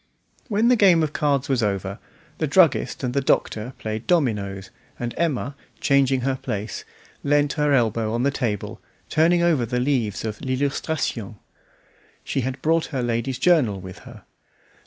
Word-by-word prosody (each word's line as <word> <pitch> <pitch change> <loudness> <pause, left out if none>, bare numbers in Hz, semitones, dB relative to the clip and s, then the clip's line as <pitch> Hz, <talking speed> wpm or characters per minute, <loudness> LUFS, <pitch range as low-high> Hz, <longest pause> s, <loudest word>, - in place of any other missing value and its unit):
When 220 +1 +2
the 250 - +6
game 185 -7 +5
of 155 -1 -2
cards 140 -2 +1
was 130 -4 +1
over, 100 -1 -2 0.4
the 155 - 0
druggist 160 -3 +3
and 125 -1 -1
the 140 - +1
Doctor 120 -2 0
played 110 +1 -5
dominoes, 105 - 0 0.3
and 120 -1 -3
Emma, 145 -4 -1 0.2
changing 135 -2 +3
her 135 +1 0
place, 105 -3 -5 0.4
leant 145 0 +2
her 150 -2 +1
elbow 115 -4 +1
on 120 +2 -1
the 140 - +2
table, 115 -7 -3 0.3
turning 170 +2 +3
over 160 -7 +3
the 125 +2 -1
leaves 125 -6 0
of 105 -1 -5
"L'Illustration". 130 -4 -2 0.9
She 135 - -2
had 130 +2 -4
brought 165 +1 +2
her 130 -5 -3
ladies' 120 +2 -1
journal 135 - +3
with 95 0 -10
her. - - -13
130 Hz, 155 wpm, -23 LUFS, 115-150 Hz, 0.9 s, the